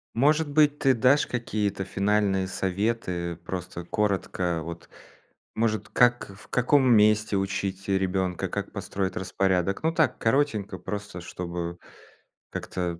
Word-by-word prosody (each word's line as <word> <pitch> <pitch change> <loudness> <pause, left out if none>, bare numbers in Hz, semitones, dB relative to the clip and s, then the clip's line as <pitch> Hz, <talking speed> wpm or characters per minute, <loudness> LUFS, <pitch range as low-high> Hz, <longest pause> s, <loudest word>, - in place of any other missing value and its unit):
Может 150 +5 +3
быть, 150 0 +3
ты 135 -1 +4
дашь 130 +4 +3
какие-то 105 -5 -2
финальные 100 0 +1
советы, 95 -3 -2
просто 90 -2 -5
коротко. 95 -5 -1
Вот, 85 +1 -8 0.7
может, 110 -2 0
как 120 -2 +3
в - - -16
каком 130 +3 +3
месте 105 -1 +4
учить 95 0 -2
ребенка, 95 -2 0
как - - -4
построить 95 -1 -3
распорядок? 95 - 0
Ну 160 - +2
так, 160 -1 +2
коротенько, 115 -4 0
просто, 105 -3 -6
чтобы 85 0 -5 0.7
как-то 85 -2 -4
100 Hz, 120 wpm, -26 LUFS, 90-115 Hz, 0.7 s, ты